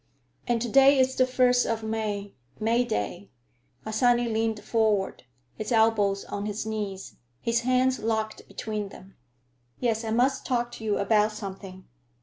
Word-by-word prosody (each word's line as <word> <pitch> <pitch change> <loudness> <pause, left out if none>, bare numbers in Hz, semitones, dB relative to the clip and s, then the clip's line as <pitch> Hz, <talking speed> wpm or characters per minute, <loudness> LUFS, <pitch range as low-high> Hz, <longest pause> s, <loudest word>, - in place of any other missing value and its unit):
"And 240 -1 +1
to - - -2
day 275 +4 +6
is 260 0 +2
the 255 - +3
first 250 -1 +3
of 225 -1 -2
May; 215 -2 -3 0.3
May 230 +3 +2
day." 175 - -3 0.5
Harsanyi 240 +2 +2
leaned 220 -1 -1
forward, 215 - 0 0.3
his 215 +1 -6
elbows 220 -3 +2
on 205 +1 -4
his 210 +1 -3
knees, 205 -3 -5 0.2
his 230 - +1
hands 255 +1 +2
locked 220 0 -2
between 210 -2 -4
them. 195 0 -14 0.6
"Yes, 230 -2 0
I 225 - -3
must 250 +4 +1
talk 240 -1 -1
to 235 - -9
you 210 -2 0
about 210 +1 +2
something. 195 -2 -8
220 Hz, 150 wpm, -27 LUFS, 205-240 Hz, 0.6 s, day